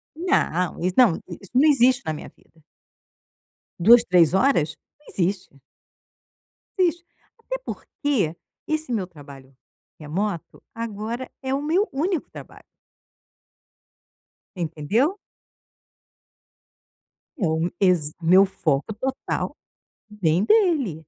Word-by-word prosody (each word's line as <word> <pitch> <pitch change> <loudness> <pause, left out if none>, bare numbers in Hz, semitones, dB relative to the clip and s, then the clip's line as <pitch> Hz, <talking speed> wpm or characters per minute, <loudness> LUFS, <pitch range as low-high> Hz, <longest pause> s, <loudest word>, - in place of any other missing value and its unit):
Não, 185 - 0
isso 180 +2 -1
não, 235 -10 +6
i - - -8
isso 195 - -14
não 285 +5 +5
existe 260 -1 +4
na 155 - -1
minha 150 - -8
vida. 165 - -27 1.2
2, 230 +6 +7
3, 175 -5 +4
horas? 190 - +2 0.3
Não 300 - -26
existe. 180 -5 -2 1.2
Não 370 - +4
existe, 345 +1 -2 0.4
até - - -3
porque 255 - -2 0.3
esse 310 -3 -2
meu 200 -6 -1
trabalho 140 -5 -14 0.4
remoto 170 +4 -4
agora 230 +2 -5
é 265 0 -2
o 275 - -1
meu 345 +8 +1
único 330 +4 -2
trabalho. - - -12 1.9
Entendeu? 185 - -1 2.2
É 205 - -1
o 160 - 0
úni 165 +3 -1
exa 175 -6 +2
o - - -7
meu 185 +4 +7
foco 160 0 -1
total. 260 +5 -3 0.5
Vem 185 -3 +1
dele. 295 - +2
205 Hz, 115 wpm, -23 LUFS, 165-275 Hz, 2.2 s, 2